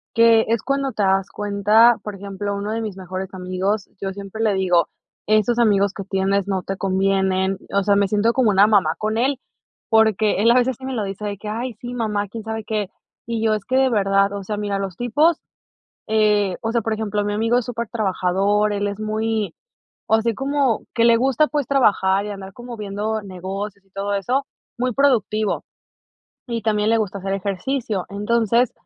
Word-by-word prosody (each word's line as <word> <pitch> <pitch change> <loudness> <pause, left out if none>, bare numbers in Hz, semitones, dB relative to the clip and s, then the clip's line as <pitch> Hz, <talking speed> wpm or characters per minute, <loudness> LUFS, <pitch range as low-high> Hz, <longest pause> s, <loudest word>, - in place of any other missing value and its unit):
que 230 -1 +5
es 230 -2 0
cuando 275 0 -1
te 215 -3 -2
das 195 0 +2
cuenta, 210 +3 +4
por 210 -1 -6
ejemplo, 200 +1 -4
uno 205 +2 -3
de 225 +1 -2
mis 210 -4 -5
mejores 185 +1 -6
amigos, 185 +3 -2
yo 195 -1 -2
siempre 200 +2 -7
le 215 -3 +2
digo: 180 -3 +2 0.4
"Esos 215 +3 +2
amigos 200 -3 +3
que 200 - -6
tienes 195 0 0
no 190 -2 -1
te 195 - -4
convienen", 190 0 +1
o 200 0 +1
sea, 200 0 +3
me 200 -1 +3
siento 215 +3 +2
como 250 -5 +3
una 200 0 +5
mamá 210 -3 +3
con 220 +1 -1
él, 265 +2 +1 0.5
porque 220 -2 +3
él 230 - +4
a 235 - +5
veces 250 -1 +2
sí 260 - -14
me 265 - -3
lo 215 - -1
dice 195 +1 -5
de 205 -1 -3
que: 210 - -9
"Ay, 230 +3 -4
sí, 245 0 -6
mamá", 210 -4 -1
quién 220 +2 -8
sabe 220 0 -4
qué, 210 -3 -2 0.4
y 230 -1 -2
yo, 220 - +3
es 210 -2 -3
que 260 - 0
de 265 -1 +3
verdad, 195 -1 +2
o 200 - -5
sea, 210 +2 -4
mira, 205 -1 -2
los 195 -3 -5
tipos, 295 +8 +2 0.7
eh, 210 -3 +2
o 225 0 -1
sea, 235 - +2
por 225 0 -1
ejemplo, 210 -1 -2
mi 205 - -1
amigo 230 +3 +2
es 245 - -3
supertrabajador, 210 -3 0
él 205 0 -1
es 200 +1 -5
muy 215 0 -2 0.5
o - - +3
sea, 225 - +1
así 230 -1 0
como 270 -2 0
que 230 - +3
le 235 0 +6
gusta, 265 +5 +2
pues, 290 -3 -1
trabajar 200 -7 +2
y - - -5
andar 195 -1 -8
como 240 +2 -9
viendo 210 +1 -3
negocios 195 +2 -6
y - - -33
todo 200 +1 -3
eso, 250 +8 0 0.3
muy 250 +1 0
productivo. 220 -5 +1 0.8
Y 230 -1 -3
también 210 -1 +1
le 230 - +4
gusta 205 -2 -2
hacer 195 +1 -3
ejercicio. 200 +1 -2
Entonces, 230 +3 +1
210 Hz, 205 wpm, -21 LUFS, 195-230 Hz, 0.8 s, le